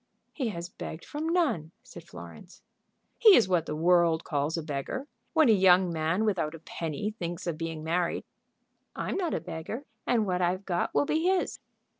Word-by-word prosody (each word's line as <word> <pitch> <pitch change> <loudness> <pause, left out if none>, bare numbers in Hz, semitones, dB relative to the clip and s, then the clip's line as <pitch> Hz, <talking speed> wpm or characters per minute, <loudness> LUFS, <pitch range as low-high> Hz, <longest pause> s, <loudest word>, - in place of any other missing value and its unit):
"He 265 -5 -2
has 170 -4 -5
begged 165 -2 -8
from 310 +2 -3
none," 285 - 0
said - - -12
Florence. - - -12 0.6
"He 435 -5 +9
is 220 - +5
what 175 -3 +1
the - - -3
world 170 0 +3
calls 150 +1 -1
a 165 - -3
beggar, 150 - -4 0.3
when 315 -3 +5
a - - +6
young 185 -3 +5
man 165 +6 0
without 165 -7 0
a - - -10
penny 165 +6 -4
thinks 175 +1 -4
of 170 -3 -1
being 165 -1 -5
married." 170 +2 0 0.7
"I'm - - -3
not 355 -4 -1
a - - 0
beggar, 165 - -6 0.2
and 230 -3 +2
what 180 -2 0
I've 185 +2 0
got 175 -2 -1
will 145 - +3
be 320 - 0
his." 375 -1 +1
175 Hz, 185 wpm, -28 LUFS, 160-220 Hz, 0.7 s, He